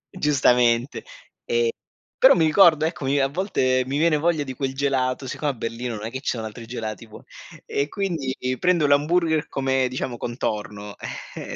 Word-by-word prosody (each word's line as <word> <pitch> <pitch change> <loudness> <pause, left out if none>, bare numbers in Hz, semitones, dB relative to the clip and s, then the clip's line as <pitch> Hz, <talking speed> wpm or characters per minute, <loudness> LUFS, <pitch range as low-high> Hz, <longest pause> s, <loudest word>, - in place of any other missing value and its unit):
Giustamente. 125 -6 +2 0.4
Ehm, 470 -1 +1 0.5
però - - +8
mi 160 - +3
ricordo, 155 -2 +5
ecco 165 -1 -3
mi 140 +2 +1
a 135 - +3
volte 135 -6 0
mi 135 +2 -1
viene 160 0 +3
voglia 160 0 +1
di 130 -2 -6
quel 135 0 -3
gelato, 135 -1 0
siccome 145 +3 -2
a - - -8
Berlino, 115 +1 -4
non 105 0 -6
è 115 - -5
che 130 - -5
ci 125 - -2
so 110 - -4
altri 110 +1 -8
gelati 115 -2 -6
buon 110 - -13 0.4
e 140 +2 -1
quindi 160 -10 -2 0.2
prendo 180 -4 +2
l'hamburger 160 +2 +2
come, 135 -1 0
diciamo, 125 -1 -4
contorno, 105 -4 -4 0.4
ehm - - -6
135 Hz, 175 wpm, -23 LUFS, 120-155 Hz, 0.5 s, però